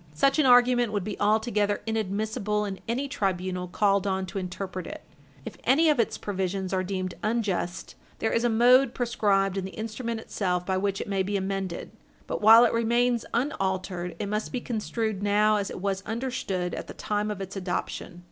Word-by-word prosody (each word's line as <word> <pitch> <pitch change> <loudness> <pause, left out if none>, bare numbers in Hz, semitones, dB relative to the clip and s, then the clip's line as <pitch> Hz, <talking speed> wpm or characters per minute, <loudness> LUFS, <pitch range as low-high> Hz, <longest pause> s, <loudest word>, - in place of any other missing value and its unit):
Such 275 - +3
an 290 - +4
argument 245 -2 +5
would 205 -3 -1
be 205 +1 -4
altogether 210 -1 +1
inadmissible 210 -1 -1
in 195 -2 -5
any 255 +5 -1
tribunal 185 -5 -2
called 200 +1 +2
on 190 -1 0
to 190 +1 -5
interpret 185 0 -5
it. - - -8 0.4
If - - -7
any 305 +6 +4
of 290 - 0
its 230 - +1
provisions 190 -1 -3
are 185 0 +1
deemed 185 -1 -3
unjust, 205 -5 -2 0.2
there 225 - -1
is 230 - +1
a 240 - +3
mode 245 +3 +5
prescribed 200 -5 +1
in 195 - -1
the 190 - -8
instrument 225 +1 -4
itself 180 -5 -2
by 190 0 0
which 195 0 -1
it - - -5
may 195 -1 0
be 200 +2 -1
amended; 190 -2 -3 0.3
but - - -4
while 225 +3 +9
it - - +1
remains 235 +1 +2
unaltered, 190 -8 -2
it 210 - -3
must 210 +2 -2
be 250 - -2
construed 220 -3 -3
now 210 +1 +3
as 200 -1 -2
it - - -7
was 195 -1 -1
understood 220 -6 -3
at - - -5
the - - -9
time 210 0 -2
of 210 -2 -4
its 195 +1 -6
adoption. 180 -1 -4
205 Hz, 190 wpm, -27 LUFS, 190-230 Hz, 0.4 s, while